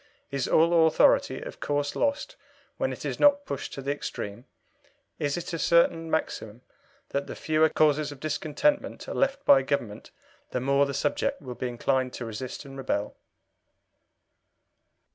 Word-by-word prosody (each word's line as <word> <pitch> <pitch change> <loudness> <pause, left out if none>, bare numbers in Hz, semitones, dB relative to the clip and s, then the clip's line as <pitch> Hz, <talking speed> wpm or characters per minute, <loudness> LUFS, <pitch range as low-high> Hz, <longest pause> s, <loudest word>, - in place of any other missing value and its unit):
Is 140 -2 -1
all 165 0 +5
authority 160 - +3
of - - -8
course 145 0 -1
lost 285 - -1 0.4
when - - 0
it - - -7
is - - -3
not 285 0 +5
pushed 140 - -5
to 135 - -6
the 140 - -1
extreme? 115 -5 -5 0.7
Is 145 +1 -1
it 175 - -5
a 165 - -2
certain 165 +1 +3
maxim 120 -7 -3 0.5
that 140 0 -2
the - - -6
fewer 155 0 +2
causes 150 -1 +2
of 145 - -10
discontentment 155 - -1
are - - -4
left 275 +1 0
by 135 - +7
Government 125 -6 -3 0.4
the 125 - -2
more 140 +2 +2
the 140 - -4
subject 145 0 0
will 130 -3 -7
be 125 - -4
inclined 130 +1 0
to 120 - -5
resist 120 +5 -6
and 135 0 -10
rebel?" 105 -6 -2
145 Hz, 160 wpm, -27 LUFS, 130-160 Hz, 0.7 s, by